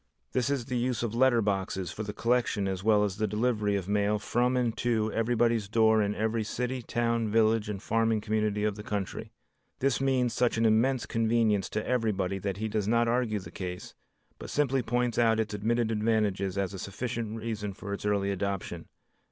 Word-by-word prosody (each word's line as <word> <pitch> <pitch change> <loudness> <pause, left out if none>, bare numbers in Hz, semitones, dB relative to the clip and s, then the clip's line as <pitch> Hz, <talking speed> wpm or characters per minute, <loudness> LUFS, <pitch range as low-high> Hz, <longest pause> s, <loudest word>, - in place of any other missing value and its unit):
This 130 +1 0
is 140 -4 -1
the 125 -1 -2
use 125 -1 -1
of 115 -2 -2
letter 120 -1 +4
boxes 95 -3 -1
for 105 - -6
the 105 -1 -4
collection 115 -3 0
as 95 -1 -3
well 105 -1 +4
as 100 -1 -2
the 110 0 0
delivery 105 -1 0
of 95 -2 -3
mail 105 +1 +1
from 125 +4 +1
and 120 -2 0
to 110 -2 0
everybody's 115 -2 +1
door 110 0 +4
in 105 0 0
every 110 +1 0
city, 125 +4 -3
town, 115 -1 0
village 110 0 +2
and 100 -2 -3
farming 115 0 +1
community 105 -1 0
of 105 -1 0
the - - -6
country. 105 -2 -4 0.5
This 135 -2 +1
means 130 -3 +1
such 120 -2 +1
an 115 - +2
immense 120 +4 +3
convenience 115 -3 +1
to 105 - -3
everybody 100 -6 0
that 95 0 -3
he 110 +1 -2
does 105 -2 -1
not 115 +1 +3
argue 115 -2 +1
the - - -10
case, 90 -1 -6 0.5
but - - -8
simply 135 -2 +1
points 120 0 0
out 115 -1 +3
its 110 -1 -1
admitted 115 +2 0
advantages 105 -3 0
as 100 0 -1
a 95 - -6
sufficient 115 +3 -4
reason 110 -2 -4
for 100 +1 -7
its 100 - -5
early 100 -1 +1
adoption. 95 -3 -3
110 Hz, 195 wpm, -29 LUFS, 105-120 Hz, 0.5 s, letter